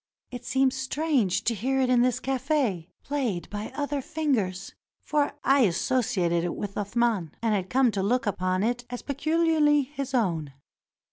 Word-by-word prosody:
It 250 -1 -7
seemed 265 0 +2
strange 265 - 0
to 235 - +1
hear 265 +5 -1
it 260 - +3
in 245 -1 +5
this 250 0 +2
cafe, 260 - -1
played 245 - -2
by 210 +3 -5
other 285 -1 -2
fingers, 250 - -2 0.3
for 290 -1 0
I 275 +1 +4
associated 185 -5 +1
it 175 - -2
with 200 -1 -5
Athman, 205 -4 0
and 225 -2 +1
had 190 -2 -1
come 255 -2 +3
to 195 -1 -2
look 245 +6 +1
upon 185 -1 0
it 240 +2 -1
as 245 0 -6
pecuharly 300 -1 +2
his 275 -2 -4
own. 165 - 0
245 Hz, 160 wpm, -26 LUFS, 200-275 Hz, 0.3 s, in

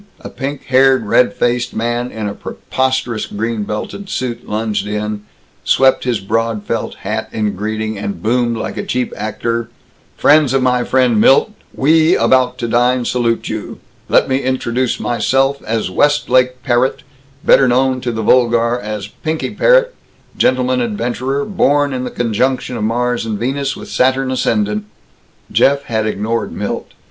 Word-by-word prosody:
A - - -8
pink 140 0 -5
haired, 130 -2 +3
red 120 +4 +3
faced 120 0 0
man 120 +2 -1
in 110 -3 -5
a 100 - -3
preposterous 130 -1 -2
green 110 +1 -3
belted 150 - -5
suit 125 -7 -4
lunged 105 -1 -2
in, 105 0 -3 0.4
swept 135 -1 +3
his 120 -4 0
broad 110 +1 -1
felt 115 - -3
hat 110 +2 -3
in 105 -2 -2
greeting, 110 +1 -3
and 100 -1 -4
boomed 120 +1 0
like - - -5
a - - -2
cheap 125 0 -2
actor: 115 +2 -3 0.5
"Friends 145 -3 +4
of 135 - +2
my 125 -1 +2
friend 125 -5 +2
Milt, 135 - +5 0.2
we 160 +4 +3
about 130 -1 +2
to 120 - -3
dine 120 +1 +2
salute 115 -2 0
you. 110 -1 -5 0.3
Let - - +4
me 130 - +1
introduce 130 -2 -1
myself 135 +4 +1
as 110 -4 -2
Westlake 130 0 +2
Parrott, 125 0 +1 0.4
better 135 - +5
known 130 +1 +1
to 125 - -2
the 110 -1 -3
vulgar 120 0 +3
as 105 -3 -5
Pinky 155 - -4
Parrott, - - +3 0.4
gentleman 130 0 +1
adventurer, 120 +5 -2
born 145 -7 +1
in 130 0 -3
the - - -3
conjunction 125 +2 -1
of 110 - -3
Mars 120 +2 0
and 110 -2 -3
Venus, 135 +4 -2
with - - -9
Saturn 130 +1 +1
ascendant." 105 -4 0 0.7
Jeff 140 0 +3
had 110 -4 -1
ignored 110 +2 -2
Milt. - - -4
120 Hz, 155 wpm, -16 LUFS, 110-130 Hz, 0.7 s, Milt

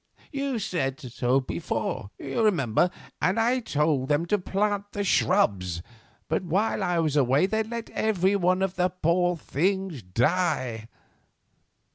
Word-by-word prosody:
You 275 -3 -2
said 155 -10 -2
so 125 -1 0
before, 125 -6 -3
you 240 - -3
remember, 175 - +2 0.3
and 190 +5 +2
I 240 +3 +2
told 150 - 0
them 150 +3 +2
to 205 +4 +1
plant 205 +2 -1
the 205 - -1
shrubs; 95 - +1 0.4
but - - 0
while 190 +6 0
I 180 -1 +1
was 155 -3 +1
away 140 +3 +4
they 220 +3 0
let 230 +1 -5
every 200 -2 +1
one 185 0 +2
of 190 -1 -2
the 180 0 +2
poor 175 0 +1
things 180 - -1
die. 125 - 0
180 Hz, 140 wpm, -26 LUFS, 135-200 Hz, 0.4 s, away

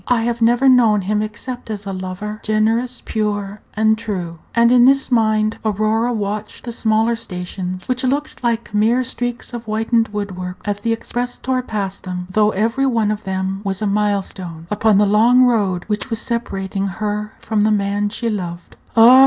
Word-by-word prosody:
I 240 -2 +2
have 235 0 -1
never 240 +3 +4
known 230 -5 +5
him 210 +3 0
except 235 +3 -6
as 205 -2 -5
a 195 - -4
lover 185 +3 -5
generous, 225 +4 0
pure, 205 -1 -2
and 220 0 +3
true." 180 -7 -4 0.2
And 235 0 +5
in 245 -1 +6
this 270 0 +4
mind 215 -2 +2
Aurora 215 +3 +1
watched 210 -1 -3
the 240 - -5
smaller 225 0 +2
stations, 185 -3 -5
which 255 +1 0
looked 280 +2 -1
like 235 -2 -1
mere 225 +5 +3
streaks 245 -1 -4
of 235 -1 -6
whitened 225 +1 +1
wood 205 -2 -4
work 180 0 -6
as 205 -1 -1
the 230 +2 -1
express 245 +2 -3
tore 260 0 -1
past 200 -5 -4
them, 180 -1 -4
though 210 +1 +3
every 225 +7 +1
one 225 -4 +1
of 215 -1 -4
them 190 0 -2
was 195 -1 -2
a 215 - -1
mile 205 -1 +1
stone 170 -4 -8
upon 210 0 +3
the 205 - +5
long 230 +5 +5
road 205 -8 +2
which 215 +4 -2
was 225 -2 -1
separating 195 -5 -2
her 210 +1 -3
from 220 -2 -1
the 215 - +3
man 205 0 +1
she 230 +3 -3
loved. 175 -5 -4 0.2
Ah! 240 +3 +9
215 Hz, 185 wpm, -19 LUFS, 200-235 Hz, 0.2 s, Ah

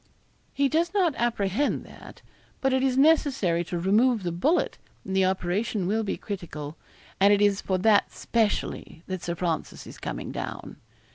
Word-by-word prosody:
'He 280 0 +2
does 335 +6 0
not 360 -6 +3
apprehend 235 +2 0
that. - - -14 0.4
But 270 -1 +1
it 260 - +2
is 260 -1 +1
necessary 270 - +3
to 175 - -4
remove 215 +5 +3
the 175 - -1
bullet, 285 - +1 0.3
and 190 - -3
the 190 -1 +4
operation 190 +2 -1
will 215 +4 +1
be 210 - -3
critical, 160 -6 -6 0.4
and 200 +1 +6
it 205 - +4
is 205 -1 +3
for 190 - 0
that 205 +2 +3
specially 215 -7 -2
that 185 -2 -5
Sir 170 - -3
Francis 170 -2 -3
is - - -11
coming - - -5
down.' - - -6
205 Hz, 165 wpm, -26 LUFS, 180-260 Hz, 0.4 s, and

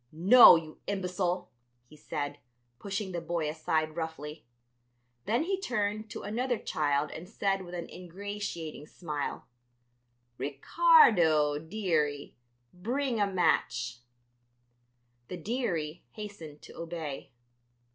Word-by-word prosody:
"No, 190 +11 +9
you 160 -2 -5
imbecile," 180 -2 -2 0.3
he 150 - -17
said, 145 -1 -5 0.4
pushing 195 -1 -4
the 175 -1 -3
boy 170 -2 -2
aside 155 0 -1
roughly. 160 -4 -6 0.8
Then 235 +7 +1
he 385 +2 -2
turned 215 - -2
to - - -7
another 240 +4 -1
child 145 -5 0
and 175 +3 -9
said 195 -3 0
with 180 -1 -8
an 170 -1 -5
ingratiating 180 -4 -6
smile: 150 -5 -5 0.9
"Ricardo, 155 - +4
dearie, 160 -5 -1 0.4
bring 240 +6 -2
a 205 - +3
match." 120 -10 0 1.3
The 180 - -6
"dearie" 170 -6 -3
hastened 200 -9 -9
to - - -13
obey. 165 -4 -6
175 Hz, 105 wpm, -30 LUFS, 155-205 Hz, 1.3 s, No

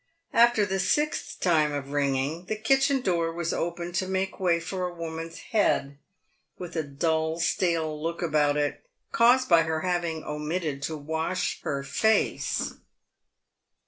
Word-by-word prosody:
After 235 -2 +5
the 195 -1 -2
sixth 295 +9 0
time 155 -4 +3
of 140 -1 -4
ringing, 145 +4 0
the 215 - -2
kitchen 270 +4 +2
door 170 -5 0
was 170 0 -2
opened 170 +1 -3
to 185 - 0
make 190 0 -2
way 175 -3 +2
for 180 +2 -3
a 175 - -7
woman's 165 0 -6 0.2
head, 145 -9 +1 0.6
with 175 -1 -8
a 160 - +1
dull, 160 +2 -1
stale 165 -3 0
look 165 +2 -3
about 150 -3 +2
it, 145 0 -1 0.3
caused 245 +2 +4
by 170 -2 +6
her 160 -1 -1
having 170 -3 -1
omitted 150 -1 -3
to 155 +2 -3
wash 160 +5 -2
her 140 -1 -2
face. 220 +11 +1
165 Hz, 145 wpm, -27 LUFS, 155-185 Hz, 0.6 s, by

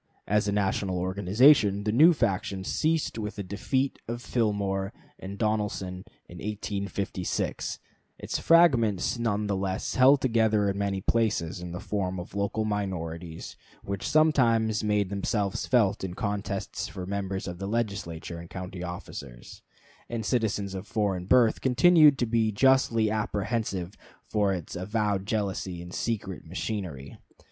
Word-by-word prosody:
As 105 +1 +1
a - - +1
national 100 -2 0
organization, 100 +4 +4
the 105 - 0
new 155 +10 +7
faction 100 - -1
ceased 155 - 0
with 105 0 -4
the 100 - -4
defeat 130 +8 -1
of 120 +1 -4
Fillmore 100 -4 -1 0.3
and 100 +1 -7
Donelson 105 -4 -2 0.2
in 90 - -11
1856; 100 -2 -3 0.4
its - - -3
fragments 120 - +4
nevertheless 100 -4 -1
held 135 +2 +6
together 110 -5 +2
in 100 - -5
many 100 -1 -1
places 100 -6 0
in 90 -1 -6
the 90 - -5
form 95 -3 -2
of 90 - -9
local 100 +2 -1
minorities, 90 -5 -4 0.3
which 100 -1 -4
sometimes 115 -9 +3
made 105 -2 +1
themselves 100 0 -1
felt 105 -6 +2
in 90 -2 -4
contests 100 -3 -3
for 90 - -7
members 95 0 -3
of 90 -1 -6
the 100 - -4
Legislature 100 -7 -3
and 85 0 -10
county 90 -1 -7
officers; 75 -8 -8 0.5
and 115 -2 -3
citizens 105 -5 0
of 95 +2 -6
foreign 95 -4 -1
birth 120 -1 +4
continued 150 +3 +6
to 120 - +1
be 110 -1 +1
justly 115 -2 +3
apprehensive 105 -3 -2 0.4
of 105 -2 +3
its 90 -5 -4
avowed 100 +1 -1
jealousy 95 -4 -2
and 90 +1 -9
secret 105 -5 -3
machinery. 85 -5 -5
100 Hz, 135 wpm, -27 LUFS, 95-110 Hz, 0.5 s, new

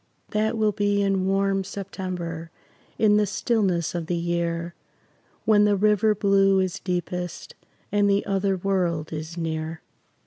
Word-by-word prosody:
That 220 +2 0
will 215 -1 +2
be 205 0 +1
in 195 -1 +1
warm 195 0 +1
September, 180 -4 -5 0.5
In 210 -1 +4
the 210 -1 +2
stillness 195 -6 0
of 170 -2 -3
the 175 - 0
year, 170 0 -2 0.7
When 210 -1 +5
the 205 -1 +3
river 210 +1 +3
blue 195 -1 +3
is 185 -2 -1
deepest 180 -1 -4 0.4
And 205 0 +3
the 200 0 +2
other 195 -1 0
world 175 -5 -1
is 155 +2 -6
near. 160 -1 -3
190 Hz, 140 wpm, -25 LUFS, 170-205 Hz, 0.7 s, When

